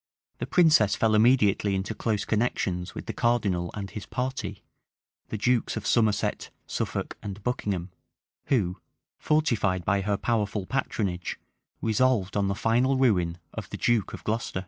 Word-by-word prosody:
[] - - -51
The - - -3
princess 155 - +5
fell 110 -1 +2
immediately 105 -3 +4
into 95 +3 -2
close 105 -2 -1
connections 95 -5 -1
with - - -6
the - - -4
cardinal 100 -8 +1
and 100 -2 -4
his 95 +2 -8
party, 125 -6 -3 0.7
the 110 - -3
dukes 120 +1 +1
of 105 - -5
Somerset, 110 -1 +1 0.2
Suffolk, - - -3
and 100 0 -7
Buckingham;[] 100 -7 -2 0.5
who, 95 -9 +1 0.4
fortified 115 - +1
by 100 -1 +2
her 100 +1 0
powerful 105 -4 -1
patronage, 100 -8 -2 0.4
resolved 110 -3 +2
on 100 -1 +2
the 100 - 0
final 120 +5 +2
ruin 90 -10 +2 0.2
of - - -6
the - - -5
duke 120 -4 +1
of - - -8
Glocester. 110 -3 -2
105 Hz, 150 wpm, -27 LUFS, 95-120 Hz, 0.7 s, princess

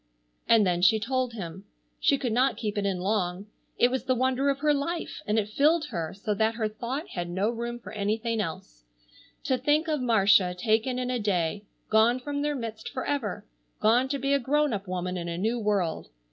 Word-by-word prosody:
And 225 -3 +6
then 175 -1 +1
she 215 +4 +5
told 255 +2 -1
him. 190 -2 -7 0.3
She 280 - +3
could 250 -5 -2
not 255 +1 +2
keep 210 -1 -3
it 205 -1 0
in 185 -2 -2
long. 190 -1 -1 0.3
It 245 - +4
was 260 - -2
the 255 - +2
wonder 260 +2 +1
of 275 - +1
her 295 +1 +2
life, 330 +4 -3
and 210 +1 +1
it 210 -2 +1
filled 300 +7 +2
her 165 -2 -3
so 210 +2 -2
that 220 +2 +1
her 225 -2 0
thought 245 +8 -5
had 175 -1 -4
no 195 +5 0
room 235 0 -4
for 240 - -11
anything 220 +2 -1
else. - - -7 0.6
To 260 -1 0
think 295 +5 +2
of 305 -3 0
Marcia 200 -6 +4
taken 220 +6 +1
in 250 0 -2
a 250 - -1
day, 200 -1 -1 0.3
gone 225 +3 +4
from 285 +2 -3
their 295 0 0
midst 225 -4 -5
forever, 230 -7 -3 0.3
gone 235 +4 +3
to 280 - -1
be 275 +1 0
a 280 - +3
grown 295 +2 +1
up 200 -1 -4
woman 180 0 -3
in 170 -1 -4
a 170 - -3
new 225 +6 0
world! 200 - -1
225 Hz, 210 wpm, -27 LUFS, 200-260 Hz, 0.6 s, And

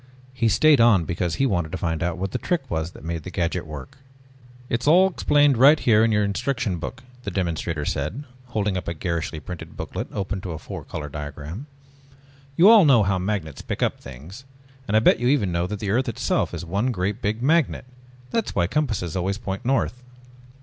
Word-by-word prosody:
He 120 -3 +1
stayed 145 +5 +5
on 105 -8 +5
because 85 0 -2
he 135 - +1
wanted 85 -10 0
to - - -1
find 80 -2 -2
out 85 -1 -1
what 95 +1 -3
the - - -2
trick 175 -5 -1
was 80 0 -1
that - - -13
made 85 0 -3
the 85 - -8
gadget 85 -2 -2
work. 75 - -9 0.7
"It's 115 +3 -2
all 180 +5 +6
explained 145 -5 +3
right 145 +5 +7
here 110 -2 +4
in 115 - +3
your 105 -1 +2
instruction 110 -2 -1
book," 120 +9 -7 0.2
the 105 - -4
demonstrator 85 -4 -2
said, 75 - -3 0.2
holding 105 -5 -1
up 90 - -6
a 85 - -3
garishly 85 -1 -3
printed 90 +2 -9
booklet - - -5
opened 100 -1 -3
to 90 -3 -5
a - - -5
four 75 - -8
color 75 -2 -6
diagram. 75 - -7 0.9
"You 175 +6 +6
all 220 -2 +9
know 130 -8 +5
how 95 -1 +1
magnets 90 -7 -3
pick - - -3
up - - 0
things 75 - -11 0.4
and 105 - +3
I - - +4
bet - - +4
you 120 - 0
even 125 -9 +2
know 85 +1 0
that 105 +2 -4
the 100 -1 -2
earth 125 +3 +1
itself 115 - -1
is - - -6
one 100 +9 0
great 100 -1 -2
big 110 +3 -2
magnet 155 -2 +2 0.5
that's 225 - -1
why 85 - +2
compasses 105 - -1
always 95 +2 -1
point 100 -3 -5
north. 125 -1 0
100 Hz, 205 wpm, -23 LUFS, 85-125 Hz, 0.9 s, all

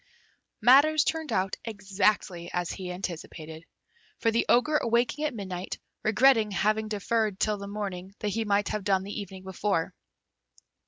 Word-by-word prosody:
Matters 285 +6 +6
turned 320 -4 -2
out 190 -3 0
exactly 195 -4 0
as 175 -1 -1
he 185 -1 -5
anticipated, 165 -3 -7 0.5
for 230 - +1
the 230 - +1
Ogre 300 +6 +4
awaking 240 +5 +1
at 295 -5 -2
midnight, 185 -3 -5 0.2
regretted 225 -2 +4
having 215 +2 +1
deferred 215 -1 -1
till 210 -1 +1
the 200 - -6
morning 195 -2 -5
what 210 - -2
he 225 +2 -1
might 205 -1 +1
have 215 -2 -3
done 190 -1 +2
the 205 +2 -5
evening 190 -2 -9
before. 190 -2 -1
205 Hz, 150 wpm, -28 LUFS, 190-230 Hz, 0.5 s, Matters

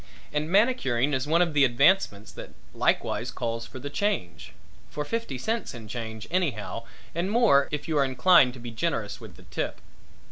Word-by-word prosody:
And 150 +1 -1
manicuring 170 - +2
is 130 +2 -1
one 165 +3 +4
of 165 -3 -3
the 145 -1 +4
advancements 125 - +3
that - - -10 0.2
likewise - - 0
calls 115 0 -4
for 130 - -10
the 145 +2 -6
change 200 - -2 0.4
for 150 - -4
fifty 230 - -3
cents 220 - -3
in 115 -2 -9
change 110 -1 -6
anyhow 125 - -2 0.3
and 170 +3 -1
more 205 - +4
if 150 -1 -4
you 155 -2 +1
are - - +5
inclined 135 0 +4
to - - -10
be 120 0 -7
generous 115 -4 -2
with 105 -6 -11
the - - -16
tip. - - -4
140 Hz, 180 wpm, -26 LUFS, 115-175 Hz, 0.4 s, are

